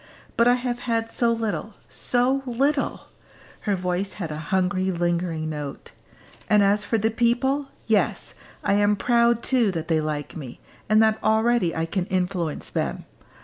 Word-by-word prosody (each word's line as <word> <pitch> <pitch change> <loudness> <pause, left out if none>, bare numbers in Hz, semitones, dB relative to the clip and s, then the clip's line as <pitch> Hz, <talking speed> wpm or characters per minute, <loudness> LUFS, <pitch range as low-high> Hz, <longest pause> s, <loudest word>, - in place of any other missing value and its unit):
But 235 0 +4
I 245 - +6
have 245 -1 -3
had 225 0 0
so 235 -1 +2
little 215 -3 -3
so 250 +3 +1
little!" 275 +4 0 0.7
Her 200 - +3
voice 180 +1 -2
had 170 -6 -5
a - - -4
hungry 190 0 +1
lingering 170 -2 -1
note. 145 -2 -6 0.6
"And 210 -1 +5
as 200 +1 +3
for 225 +2 0
the 220 +1 +1
people, 265 +5 +1 0.2
yes, 220 -3 0 0.3
I - - +2
am 205 +1 +3
proud 235 +1 +2
too 245 -5 +3
that 165 -1 -4
they 160 -1 +2
like 150 -1 -4
me, 135 -7 -8 0.3
and 215 +1 +5
that 220 0 +1
already 220 -4 +2
I 160 - 0
can 180 +2 -2
influence 180 -4 -2
them. - - -3
205 Hz, 160 wpm, -24 LUFS, 175-235 Hz, 0.7 s, I